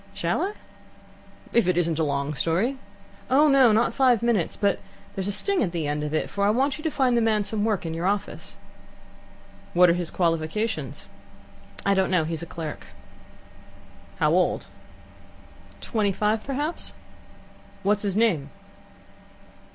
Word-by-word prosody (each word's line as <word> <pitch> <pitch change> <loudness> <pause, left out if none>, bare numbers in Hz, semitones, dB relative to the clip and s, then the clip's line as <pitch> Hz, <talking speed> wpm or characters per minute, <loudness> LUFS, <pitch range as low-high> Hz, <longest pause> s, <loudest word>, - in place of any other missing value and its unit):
"Shall - - -1
I?" 400 +2 -1 1.0
"If 235 -6 +3
it 180 -2 +2
isn't 165 -2 +1
a - - +2
long 140 0 -1
story." 185 - 0 0.5
"Oh, 290 +4 +5
not 240 -4 +4
five 250 -4 +3
minutes; 225 -8 +1
but 200 -2 +1 0.3
there's 190 0 -3
a - - 0
sting 395 - 0
at 180 -6 -1
the 165 -3 -2
end 150 0 -2
of 150 - -3
it, 155 - 0
for 200 - -3
I 200 - +4
want 270 +6 +1
you - - -9
to - - +2
find 260 -5 +1
the 235 - +3
man 215 -2 +2
some 210 0 -2
work 210 -5 0
in 165 - -3
your 170 +3 -2
office." 200 0 -3 1.2
"What 180 0 +6
are - - +3
his 175 -1 -3
qualifications?" 165 - -2 0.8
"I 200 - +4
don't 190 -1 +2
know. 180 -3 +2
He's 160 +1 -4
a 170 - -7
clerk." 160 -2 -7 1.3
"How - - +2
old?" - - +1 1.2
"Twenty 210 -4 0
five, 210 +2 0
perhaps." 290 +5 -2 0.9
"What's 205 +1 +2
his 200 -2 -1
name?" 175 -11 +2
200 Hz, 160 wpm, -25 LUFS, 165-235 Hz, 1.3 s, What